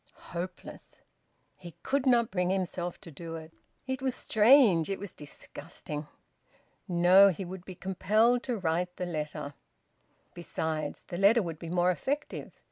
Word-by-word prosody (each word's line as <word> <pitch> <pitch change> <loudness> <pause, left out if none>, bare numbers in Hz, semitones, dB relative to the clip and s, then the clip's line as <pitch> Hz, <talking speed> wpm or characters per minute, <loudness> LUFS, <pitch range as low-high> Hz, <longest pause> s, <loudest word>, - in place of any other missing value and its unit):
Hopeless! 175 +2 -7 0.6
He 170 -3 -12
could 275 0 0
not 235 -3 +4
bring 180 -1 0
himself 180 -2 -2
to 165 - -11
do 165 +2 -7
it. 160 0 -9 0.3
It 260 -1 -3
was 260 -1 -1
strange! 215 - +5
It 195 - -1
was 200 -2 -8
disgusting!... 150 0 -8 0.8
No, 180 +3 +6
he 190 +1 -4
would 185 0 -8
be 185 - -8
compelled 215 +7 +2
to 245 -3 -1
write 180 0 -1
the 180 - -3
letter. 150 -3 -4 0.8
Besides, 160 -3 -4
the 175 - -4
letter 210 +3 +5
would 165 -3 -6
be 165 - -7
more 180 +1 +3
effective. 285 +11 -3
180 Hz, 145 wpm, -29 LUFS, 165-210 Hz, 0.8 s, No